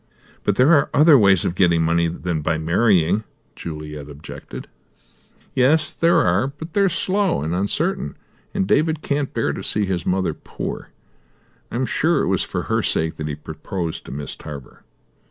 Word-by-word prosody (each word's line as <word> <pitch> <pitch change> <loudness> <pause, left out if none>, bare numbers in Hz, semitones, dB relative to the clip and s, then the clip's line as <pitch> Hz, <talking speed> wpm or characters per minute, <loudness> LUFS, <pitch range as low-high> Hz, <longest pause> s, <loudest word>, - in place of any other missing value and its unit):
"But 105 - +1
there 130 +9 +5
are 140 -3 +4
other 155 +1 +7
ways 100 - +5
of - - 0
getting 85 -3 +3
money 85 +1 +2
than 85 -1 -3
by 80 +2 0
marrying," 90 +3 +2 0.3
Juliet 75 -3 -7
objected. 75 +3 -9 0.9
"Yes, 155 +5 +3
there 170 +1 +3
are; 90 +8 +2
but 155 +4 -9
they 200 - +2
are 195 - +4
slow 190 - 0
and 80 +2 -2
uncertain, 100 - -1 0.3
and 95 - 0
David 155 - +1
can't 140 -1 -1
bear - - -1
to - - -6
see 105 -1 0
his 90 -3 -2
mother 95 +1 0
poor. - - -6 0.8
I - - -7
am 130 +2 0
sure 160 +3 +1
it - - -1
was 95 - +1
for - - -3
her - - 0
sake 80 0 -1
that 75 - -4
he 75 - -3
proposed 85 +2 -5
to - - -9
Miss 70 0 -5
Tarver." 70 -3 -10
95 Hz, 175 wpm, -21 LUFS, -, 0.9 s, other